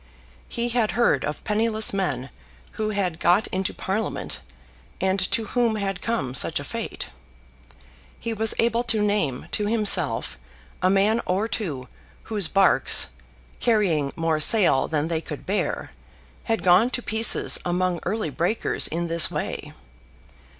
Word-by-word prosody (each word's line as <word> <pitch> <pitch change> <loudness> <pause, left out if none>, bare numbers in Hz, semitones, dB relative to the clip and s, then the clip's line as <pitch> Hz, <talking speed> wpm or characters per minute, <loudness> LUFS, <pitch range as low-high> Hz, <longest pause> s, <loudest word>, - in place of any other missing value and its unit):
He 235 0 -2
had 235 -3 0
heard 195 - +3
of 150 - -4
penniless 220 0 +2
men 145 -10 -2 0.4
who 215 -1 -3
had 190 -6 -2
got 180 +5 +3
into 190 0 -1
Parliament, 205 +2 -3 0.6
and 190 +1 +1
to 225 - 0
whom 235 0 0
had 195 -3 -3
come 145 - -2
such 130 - +2
a - - -6
fate. - - -5 1.1
He 230 - -3
was 220 0 0
able 235 0 +2
to 225 -2 +1
name 205 -11 -1
to 210 - -1
himself 180 - +1 0.4
a 185 - +3
man 200 +4 +2
or 195 +4 0
two 150 - -4 0.4
whose 210 -6 +1
barks, 195 - +3 0.5
carrying 180 - +1
more 165 -1 0
sail 175 -4 +5
than 155 -1 -1
they 165 -1 -2
could 150 -3 -8
bear, 200 +2 -2 0.5
had 225 -1 -1
gone 185 +6 +5
to 245 -1 -4
pieces 220 +1 +3
among 180 0 -1
early 215 -8 -2
breakers 175 +9 0
in 170 +2 -3
this 165 -2 +4
way. - - -5
195 Hz, 145 wpm, -24 LUFS, 165-220 Hz, 1.1 s, sail